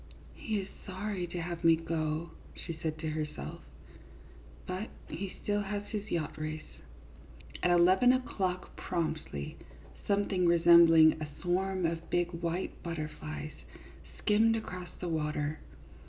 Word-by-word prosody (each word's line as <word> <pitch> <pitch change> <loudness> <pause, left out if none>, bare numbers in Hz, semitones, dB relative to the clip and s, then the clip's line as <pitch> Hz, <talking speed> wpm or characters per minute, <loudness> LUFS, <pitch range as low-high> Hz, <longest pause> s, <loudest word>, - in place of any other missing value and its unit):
" - - -20
He 215 -2 -2
is 190 - -7 0.2
sorry 190 -1 -3
to 175 +1 -5
have 170 0 -4
me 165 -1 +7
go," 160 0 -2 0.2
she 170 - -6
said 160 -1 -2
to 155 0 -3
herself, 150 - -4 0.5
" - - -20
but 185 +4 -4 0.2
he 195 +1 -5
still 205 0 +1
has 205 0 -3
his 210 -1 -4
yacht 155 -3 -2
race." 155 0 -6 0.8
At 180 - +3
eleven 185 +8 +6
o'clock, 190 -8 -1
promptly, 155 - -3 0.5
something 200 -3 +2
resembling 165 -2 +7
a 155 - -2 0.2
swarm 185 +1 +1
of 165 0 -2
big 175 0 +1
white 170 +1 -3
butterflies 155 - -5 0.6
skimmed 225 +2 +4
across 180 -5 -5
the 180 - -3
water. 150 -2 -1
170 Hz, 135 wpm, -32 LUFS, 160-190 Hz, 0.8 s, me